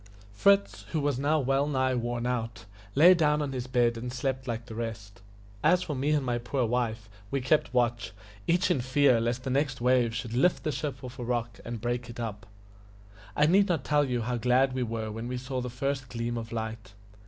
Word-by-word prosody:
Fritz, 200 - +3
who 160 - +1
was 145 -3 0
now 150 +3 +2
well 135 +1 +1
nigh 130 -2 +1
worn 120 -1 -2
out, 115 -2 -3 0.3
lay 170 +6 +8
down 150 -4 +2
on 145 -2 -2
his 130 -1 -4
bed 120 -2 +2
and 120 +2 -5
slept 130 0 -3
like 115 -1 -3
the 115 - -9
rest. 110 -3 -6 0.4
As 180 +3 +4
for 150 - -4
me 135 +3 -1
and 150 -3 +2
my 120 -1 0
poor 120 +2 -1
wife, 115 -2 -1 0.2
we 140 - 0
kept 135 +1 +1
watch, 120 -6 0 0.4
each 180 +2 +2
in 140 - +1
fear 130 -1 +3
lest 120 +2 -1
the 130 - -3
next 135 -1 0
wave 120 -2 +2
should 115 0 -4
lift 170 +9 +2
the 155 - 0
ship 135 -1 -4
off 125 0 -8
the 125 - -5
rock 120 -1 -2
and 115 -2 -6
break 120 0 -2
it 120 - -9
up. 105 -4 -5 0.9
I 150 - +4
need 195 +5 +4
not 165 -7 0
tell 145 0 +2
you 125 -3 -1
how 120 +2 -1
glad 125 +3 +3
we 130 - -2
were 110 -2 -3
when 115 +2 -5
we 125 0 -3
saw 130 +1 -4
the 125 - -4
first 130 +1 -3
gleam 120 0 -3
of 115 -1 -5
light. 110 -3 -5
125 Hz, 220 wpm, -28 LUFS, 115-140 Hz, 0.9 s, lay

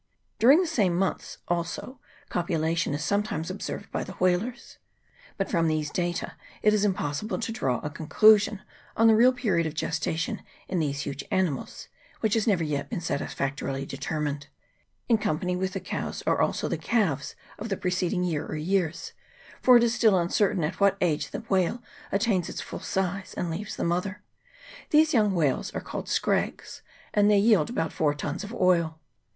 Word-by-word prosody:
During 270 +8 +7
the 370 - +2
same 210 - +1
months 190 +1 -2
also 175 +9 -3 0.3
copulation 165 -2 0
is 150 - -3
sometimes 200 -3 -1
observed 200 +1 -6
by - - -2
the - - -8
whalers. 185 +7 -1 0.6
But 195 - -1
from 165 -3 +2
these 155 -2 -1
data 175 -1 -2 0.3
it 210 - +5
is 210 -1 +2
impossible 190 0 -1
to 225 0 -3
draw 130 - 0
a 150 - -3
con 155 +1 -8
clusion 210 0 +5 0.4
on 225 - +4
the 225 -1 +7
real 245 +3 +6
period 195 -10 0
of 155 - -6
gestation 160 +1 -2 0.3
in 185 - -1
these 140 -3 -1
huge 140 0 -5
animals, 180 -8 -2 0.3
which 215 -2 +1
has 225 -1 +1
never 190 -6 +3
yet 145 -2 -2
been - - -3
satisfactorily 140 -3 -3
de 135 - -7
termined. 145 0 -3 0.6
In 230 -3 +3
company 180 0 -1
with 190 +1 -2
the - - -2
cows - - -4
are - - +2
also - - 0
the - - -2
calves 190 - 0 0.2
of 220 +2 -5
the 195 - -1
preceding 180 -1 0
year 160 -4 -1
or - - -4
years, 165 0 -1 0.5
for 250 -1 +8
it 235 - +4
is 235 -1 +2
still 220 -5 +4
uncertain 180 +1 +1
at 155 +4 -2
what 200 -1 +4
age 160 -5 0
the - - -5
whale 205 +2 0 0.3
attains 195 -3 +1
its - - -5
full - - -6
size 190 0 -3
and 175 - -2
leaves 195 +6 -5
the - - -3
mother; 180 +3 -1 0.7
these 310 +1 +4
young 210 -5 +3
whales 150 -6 +1
are - - 0
called - - -6
scrags, - - -1 0.3
and 205 0 +4
they 210 - +5
yield 200 -6 +4
about 165 -9 -2
four 150 -2 +1
tuns 150 +5 -4
of 205 - -7
oil. 170 -5 +2
180 Hz, 180 wpm, -27 LUFS, 160-210 Hz, 0.7 s, for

